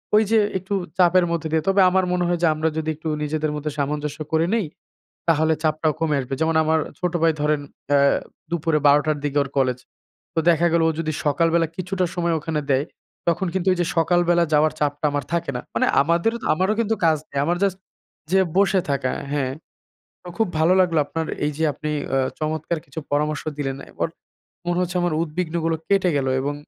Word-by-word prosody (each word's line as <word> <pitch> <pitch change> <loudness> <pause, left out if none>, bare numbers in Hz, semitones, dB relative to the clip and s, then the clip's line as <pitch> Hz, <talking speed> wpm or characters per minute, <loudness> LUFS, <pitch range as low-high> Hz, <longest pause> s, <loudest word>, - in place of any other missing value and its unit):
ঐযে 220 +1 +4 0.2
একটু 190 +2 -5 0.2
চাপের 180 0 +5
মধ্যে 165 -1 -1
দিয়ে 160 -1 +1
তবে 195 0 +4
আমার 190 0 +2
মনে 180 -1 +1
হয় 175 -1 0
যে - - +6
আমরা 155 +1 0
যদি 160 0 -2
একটু 160 +1 -5
নিজেদের 155 0 -1
মধ্যে 150 0 -3
সামঞ্জস্য 150 +1 -2
করে 160 +1 +2
নেই, 215 -6 0 0.6
তাহলে 160 0 +3
চাপটাও 155 0 +1
কমে 155 -3 +1
আসবে। 130 +1 -4
যেমন 160 0 +1
আমার 160 +1 +2 0.2
ছোট 180 -1 -1
ভাই 165 -1 +5
ধরেন 150 0 +1 0.3
অ্যা 145 0 +4 0.5
দুপুরে 165 -2 +1
১২ 145 +1 +6
টার 155 -1 +1
দিকে 145 0 0
ওর 140 - -6
কলেজ। 130 -2 +2 0.6
তো - - -1
দেখা 170 +1 +3
গেল 170 -1 +3
ও - - +3
যদি 155 -1 -2
সকালবেলা 165 +3 +2
কিছুটা 185 0 -1
সময় 170 -2 0
ওখানে 155 0 -2
দেয়, 135 +2 +3 0.4
তখন 170 +3 +1
কিন্তু 190 0 0
ওইযে 175 -2 0
সকালবেলা 175 +1 +3
যাওয়ার 150 0 +4
চাপটা 145 0 -1
আমার 145 -2 -2
থাকে 170 -3 0
না। - - -3
মানে - - +2 0.2
আমাদেরও 170 +9 +1 0.2
আমারও 190 +6 +1
কিন্তু 225 0 +1
কাজ 160 -2 +4
নেই। 140 - -3
আমার 175 +2 +1
জাস্ট 190 -2 +1 0.5
যেয়ে 190 -1 +4
বসে 195 -1 +4
থাকা 135 -2 0 0.2
হ্যাঁ, 135 -3 -1 0.8
অ - - -5
খুব 225 - +2
ভালো 165 +3 +4
লাগলো 165 -4 +2
আপনার 160 +2 -3 0.2
এইযে 150 +2 -2
আপনি 150 +2 -4 0.2
অ্যা 135 0 +1 0.2
চমৎকার 155 +2 -2
কিছু 140 +3 -7
পরামর্শ 150 +1 0
দিলেন। 135 -2 -3
এখন - - -2 0.6
মনে 175 +1 +1
হচ্ছে 180 0 -3
আমার 175 -2 0
উদ্বিগ্নগুলো 165 0 -2
কেটে 195 -2 +3
গেল 135 -1 -1
এবং 145 +1 -2
160 Hz, 190 wpm, -22 LUFS, 150-175 Hz, 0.8 s, যে